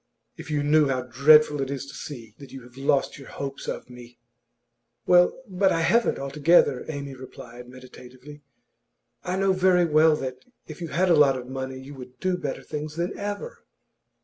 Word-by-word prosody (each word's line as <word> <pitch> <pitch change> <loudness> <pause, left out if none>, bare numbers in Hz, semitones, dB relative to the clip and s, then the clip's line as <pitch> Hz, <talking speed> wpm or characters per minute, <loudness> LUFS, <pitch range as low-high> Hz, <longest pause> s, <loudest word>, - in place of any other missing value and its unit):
If - - -11
you 150 -1 -1
knew 150 0 +4
how 130 -2 -1
dreadful 145 +4 +4
it 135 - -3
is 140 0 -4
to 140 - -12
see 115 -7 -9
that 140 -3 -12
you 135 -2 -10
have 125 0 -17
lost 135 +1 0
your 135 - -12
hopes 140 -1 -7
of - - -5
me!' 125 -1 -14 0.9
'Well, 180 +5 +4
but 190 0 +1
I 165 - 0
haven't 230 +8 +2
altogether,' 140 0 +2
Amy 140 -2 -6
replied, 125 -2 -12
meditatively. 130 +3 -14 0.8
'I 180 - -2
know 195 0 +2
very 185 -1 +3
well 155 0 +4
that, 130 -3 -5 0.3
if - - -11
you 170 - -4
had 175 +5 +1
a - - +6
lot 140 -3 +4
of 125 - -7
money, 130 0 -6
you 135 +2 -11
would 125 -1 -12
do 185 -1 0
better 150 -7 -5
things 150 0 -6
than 175 +3 -3
ever. 205 - -6
140 Hz, 185 wpm, -25 LUFS, 130-165 Hz, 0.9 s, a